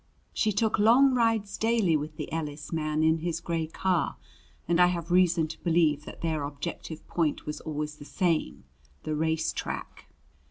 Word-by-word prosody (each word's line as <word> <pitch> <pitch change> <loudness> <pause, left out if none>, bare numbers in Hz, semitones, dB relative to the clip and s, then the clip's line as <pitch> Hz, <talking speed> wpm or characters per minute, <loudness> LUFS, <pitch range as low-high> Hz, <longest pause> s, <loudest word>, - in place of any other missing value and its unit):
She 215 - +1
took 215 +2 +1
long 250 +6 +6
rides 225 -4 +1
daily 220 -7 +2
with 150 +1 -3
the - - -5
Ellis 150 -1 -4
man 155 -1 0
in 160 +1 +3
his 165 0 -2
gray 165 -2 -2
car, 175 0 0 0.5
and 170 +1 +2
I 180 - +7
have 175 -1 -3
reason 175 -3 +4
to 160 - -9
believe 160 -4 +2
that - - -10
their 160 -2 -1
objective 150 +2 -6
point 160 -4 -1
was 150 - -5
always 150 -1 -4
the 145 - -11
same 170 -1 -1 0.4
the 155 - -2
race 160 +1 0
track. - - -6
165 Hz, 170 wpm, -28 LUFS, 155-185 Hz, 0.5 s, I